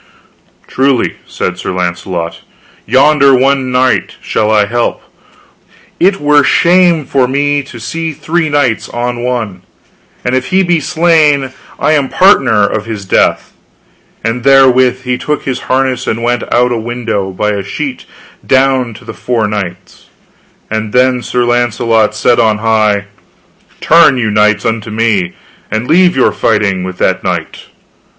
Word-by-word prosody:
Truly, 135 Hz, -2 st, 0 dB
said 90 Hz, 0 st, -4 dB
Sir -, -, -4 dB
Launcelot, 85 Hz, -1 st, -4 dB, 0.5 s
yonder 140 Hz, +2 st, +4 dB
one 135 Hz, 0 st, +1 dB
knight 125 Hz, 0 st, 0 dB
shall 110 Hz, -1 st, -1 dB
I 105 Hz, -1 st, +3 dB
help, 120 Hz, +4 st, -2 dB
for -, -, -30 dB, 0.9 s
it 195 Hz, +2 st, +2 dB
were 145 Hz, 0 st, +3 dB
shame 170 Hz, -1 st, +3 dB
for 130 Hz, -2 st, +1 dB
me 145 Hz, +2 st, 0 dB
to 130 Hz, -3 st, -12 dB
see 165 Hz, +8 st, -4 dB
three 155 Hz, +2 st, -2 dB
knights 145 Hz, -6 st, 0 dB
on 120 Hz, 0 st, -3 dB
one, 115 Hz, -7 st, -3 dB, 0.6 s
and 125 Hz, -, -1 dB
if 130 Hz, 0 st, -1 dB
he 190 Hz, +1 st, +2 dB
be 175 Hz, -2 st, +1 dB
slain 150 Hz, -4 st, +2 dB, 0.3 s
I -, -, +1 dB
am 145 Hz, -3 st, +1 dB
partner 130 Hz, -, +3 dB
of 105 Hz, +1 st, -3 dB
his 105 Hz, -3 st, -6 dB
death. -, -, 0 dB, 0.7 s
And 115 Hz, +2 st, -2 dB
therewith 130 Hz, -1 st, +4 dB
he 125 Hz, -1 st, -2 dB
took 150 Hz, -1 st, -3 dB
his 130 Hz, -2 st, -3 dB
harness 130 Hz, -1 st, 0 dB
and 115 Hz, +1 st, -2 dB
went 120 Hz, 0 st, 0 dB
out 125 Hz, +1 st, +2 dB
at 120 Hz, -, 0 dB
a -, -, -3 dB
window 115 Hz, -4 st, -3 dB
by 105 Hz, +3 st, -2 dB
a 100 Hz, -1 st, -2 dB
sheet 135 Hz, +7 st, -6 dB, 0.4 s
down 130 Hz, -3 st, +1 dB
to -, -, -14 dB
the -, -, -8 dB
four 115 Hz, -4 st, -2 dB
knights, 95 Hz, -3 st, -6 dB, 0.6 s
and 110 Hz, -1 st, -3 dB
then 125 Hz, 0 st, +2 dB
Sir 125 Hz, 0 st, -1 dB
Launcelot 120 Hz, -2 st, +1 dB
said 120 Hz, -, +2 dB
on 110 Hz, -2 st, +2 dB
high, 105 Hz, -2 st, +1 dB, 0.8 s
Turn 165 Hz, -5 st, +5 dB
you 110 Hz, -3 st, -1 dB
knights 105 Hz, 0 st, +2 dB
unto 110 Hz, -1 st, -2 dB
me, 110 Hz, -5 st, 0 dB, 0.4 s
and 110 Hz, +3 st, -3 dB
leave 180 Hz, +2 st, +3 dB
your 130 Hz, -, +3 dB
fighting 105 Hz, -4 st, 0 dB
with 95 Hz, -1 st, -6 dB
that -, -, 0 dB
knight. -, -, -4 dB
125 Hz, 155 wpm, -12 LUFS, 110-140 Hz, 0.9 s, Turn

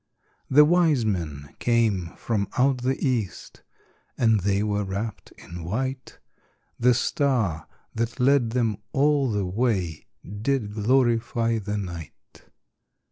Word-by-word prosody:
The 150 Hz, +3 st, +7 dB
wise 160 Hz, -7 st, +3 dB
men 75 Hz, -8 st, -3 dB
came 110 Hz, -8 st, +1 dB
from 105 Hz, -4 st, -1 dB
out 130 Hz, 0 st, +3 dB
the 130 Hz, +2 st, 0 dB
east, 115 Hz, -8 st, -3 dB, 0.6 s
And 115 Hz, -3 st, +3 dB
they 100 Hz, +1 st, +1 dB
were 105 Hz, -1 st, 0 dB
wrapped 100 Hz, +3 st, -5 dB
in 85 Hz, 0 st, -9 dB
white; 130 Hz, +9 st, -4 dB, 0.6 s
The 125 Hz, +1 st, +4 dB
star 120 Hz, -, 0 dB, 0.3 s
that 115 Hz, +1 st, -3 dB
led 130 Hz, -2 st, +3 dB
them 115 Hz, -3 st, 0 dB, 0.2 s
all 145 Hz, -1 st, +3 dB
the 105 Hz, -3 st, -1 dB
way 95 Hz, -5 st, -1 dB, 0.2 s
Did 105 Hz, +2 st, -2 dB
glorify 115 Hz, 0 st, +1 dB
the 105 Hz, 0 st, -3 dB
night. 85 Hz, -6 st, -9 dB
115 Hz, 120 wpm, -25 LUFS, 100-130 Hz, 0.6 s, The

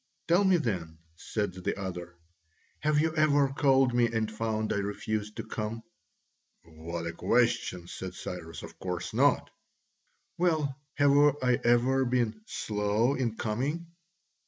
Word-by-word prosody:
"Tell 175 Hz, +4 st, +4 dB
me 190 Hz, -2 st, +5 dB
then," 90 Hz, -, -3 dB, 0.2 s
said 105 Hz, +2 st, -3 dB
the 95 Hz, +2 st, -3 dB
other, 90 Hz, -2 st, -6 dB, 0.6 s
"have 150 Hz, 0 st, +2 dB
you 160 Hz, +1 st, +1 dB
ever 145 Hz, -3 st, +4 dB
called 135 Hz, -2 st, +3 dB
me 120 Hz, -1 st, +4 dB
and 110 Hz, -1 st, -1 dB
found 110 Hz, 0 st, -1 dB
I -, -, -1 dB
refused 105 Hz, +1 st, -3 dB
to 115 Hz, -, -3 dB
come?" 110 Hz, 0 st, -4 dB, 0.8 s
"What 85 Hz, +1 st, -6 dB
a 85 Hz, -, -3 dB
question!" 115 Hz, -7 st, +1 dB
said 90 Hz, 0 st, -7 dB
Cyrus, 85 Hz, -2 st, -7 dB
"of -, -, -11 dB
course 90 Hz, 0 st, -4 dB
not." 135 Hz, +4 st, +3 dB, 0.9 s
"Well, 155 Hz, -6 st, +1 dB, 0.2 s
have 145 Hz, -1 st, +4 dB, 0.3 s
I 125 Hz, -1 st, +3 dB
ever 125 Hz, +3 st, +3 dB
been 120 Hz, -3 st, 0 dB
slow 105 Hz, +4 st, 0 dB
in 120 Hz, -5 st, -1 dB
coming?" 140 Hz, +11 st, -2 dB
115 Hz, 135 wpm, -29 LUFS, 100-135 Hz, 0.9 s, me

